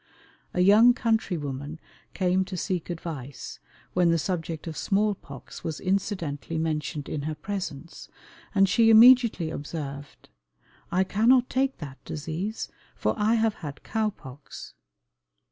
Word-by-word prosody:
A 180 - +2
young 220 +6 +7
country 225 -7 0
woman 145 +1 -5 0.4
came 185 0 +2
to 185 0 -6
seek 180 -1 -2
advice, 155 -6 -6 0.3
when 180 -1 +3
the 165 - +3
subject 165 -2 -3
of 160 -2 -5
small 205 +5 +1
pox 140 -8 -11
was 160 -2 -4
incidentally 180 -6 -2
mentioned 155 -2 -2
in 150 - -3
her 155 - -3
presence, 180 -5 -6 0.5
and 195 0 +5
she 225 +4 +4
immediately 225 -7 +7
observed, 145 -2 -7 0.6
"I 185 +2 +3
cannot 240 +6 +3
take 270 +1 +1
that 140 -4 -9
disease, 165 +8 -4 0.3
for - - 0
I 215 +2 +2
have 225 -1 +2
had 145 -3 -7
cow 220 -1 0
pox." 135 -7 -11
180 Hz, 135 wpm, -26 LUFS, 150-210 Hz, 0.6 s, young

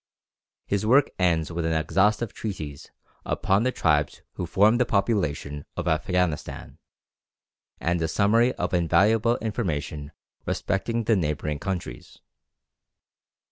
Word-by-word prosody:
His 100 0 -1
work 130 +6 +4
ends 85 -3 +1
with 85 0 -3
an 80 0 0
exhaustive 100 +7 +1
treatise 75 -10 -6 0.3
upon 95 +2 +1
the 130 +2 +1
tribes 75 - 0
who 90 - -4
form 105 +7 +4
the - - +5
population 75 -9 -1
of - - -3
Afghanistan, 80 +1 -1 1.0
and 85 0 0
a 80 - +1
summary 110 +8 +3
of - - -3
invaluable 105 +7 +3
information 75 - -3 0.4
respecting 115 +4 -1
the 110 +1 +3
neighbouring 75 -4 -2
countries. 90 -11 -5
90 Hz, 115 wpm, -25 LUFS, 80-110 Hz, 1.0 s, the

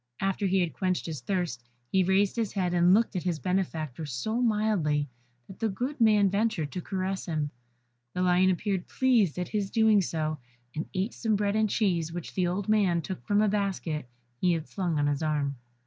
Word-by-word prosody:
After 195 +1 0
he 190 0 +2
had 170 -3 -1
quenched 185 -1 -1
his 160 -4 -5
thirst, 175 -11 -2 0.3
he 190 -1 +4
raised 190 +2 +2
his 225 -4 -1
head 180 -3 0
and 175 0 +4
looked 220 +2 +3
at 180 - 0
his 175 -2 -1
benefactor 160 -4 -2
so 220 - -2
mildly, 210 -11 +1 0.4
that 195 - -13
the 225 - +1
good 250 +7 -4
man 210 -3 +5
ventured 200 -6 0
to 180 - -4
caress 190 +1 -3
him. 155 -3 -1 0.6
The 180 - 0
lion 180 +1 +4
appeared 190 0 -1
pleased 235 - +2
at 180 -1 -3
his 205 -3 -1
doing 220 -2 +4
so, 155 -3 -2 0.4
and 155 - -4
ate 190 +4 -1
some 220 -2 0
bread 200 0 0
and 215 -1 +2
cheese 175 -7 +1
which 175 -1 -6
the 185 -2 +1
old 185 +3 -2
man 195 -6 +2
took 185 - -6
from 205 0 +3
a - - +3
basket 190 - -2 0.3
he 180 -1 +3
had 160 -2 -3
slung 175 -5 -2
on 145 - +2
his 145 0 0
arm. 145 -3 0
185 Hz, 200 wpm, -28 LUFS, 165-205 Hz, 0.6 s, man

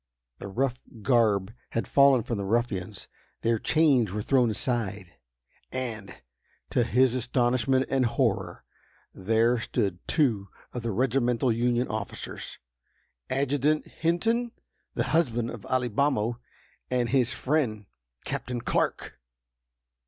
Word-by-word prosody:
The - - -6
rough 125 +5 -1 0.2
garb 110 -5 +2 0.2
had 115 - -1
fallen 140 -4 +5
from 115 -2 -3
the - - -2
ruffians; 100 -2 -2 0.3
their 115 -1 +1
chains 140 - +3
were 105 +1 -3
thrown 125 -2 +3
aside, 105 -6 -2 0.6
and, 115 -6 -5 0.6
to - - +3
his 125 +1 +3
astonishment 130 +1 +1
and 130 -2 +2
horror, 115 -3 -1 0.5
there 115 +5 +2
stood 100 -6 -1
two 115 -11 +1 0.3
of 125 - -4
the 115 - -3
regimental 125 +2 +1
Union 120 +2 +1
officers, 110 -1 -6 0.7
ADJUTANT 140 +3 +1 0.2
HINTON, 225 +9 +1 0.5
the - - +1
husband 120 -8 +1
of 115 -5 -9
Alibamo, 120 -2 0 0.5
and 125 -2 0
his 125 -1 +2
friend, 125 -9 -1 0.4
CAPTAIN 125 -1 -3
CLARK! - - -1
120 Hz, 115 wpm, -27 LUFS, 110-130 Hz, 0.7 s, fallen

